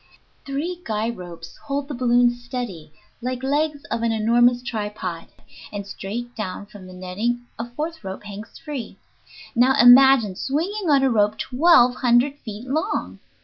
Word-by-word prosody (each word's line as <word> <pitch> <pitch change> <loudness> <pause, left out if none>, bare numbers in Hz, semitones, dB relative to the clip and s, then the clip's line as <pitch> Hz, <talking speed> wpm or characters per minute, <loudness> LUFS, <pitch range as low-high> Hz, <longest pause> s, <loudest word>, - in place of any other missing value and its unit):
Three 330 +6 -3
guy 220 +1 -1
ropes 175 -5 -10
hold 280 0 -2
the 290 - -5
balloon 245 -1 +3
steady 240 - -6 0.3
like 255 +1 -3
legs 290 +1 0
of 230 - -1
an 230 0 +1
enormous 240 +3 +3
tripod, 210 -7 -4 0.4
and 205 -1 -5
straight 225 +5 -6
down 200 -2 -5
from 205 -2 -13
the 185 - -11
netting 210 +7 -3
a 235 +1 -4
fourth 310 +5 -5
rope 190 +1 -6
hangs 205 +2 -9
free. 290 -6 -7 0.6
Now, 255 +3 +4
imagine 245 -4 +7
swinging 335 - -2
on 280 -2 +4
a 265 - +3
rope 210 -1 +2
twelve 255 -2 +4
hundred 255 +4 +2
feet 220 0 -8
long! 315 +10 -2
240 Hz, 150 wpm, -23 LUFS, 210-270 Hz, 0.6 s, imagine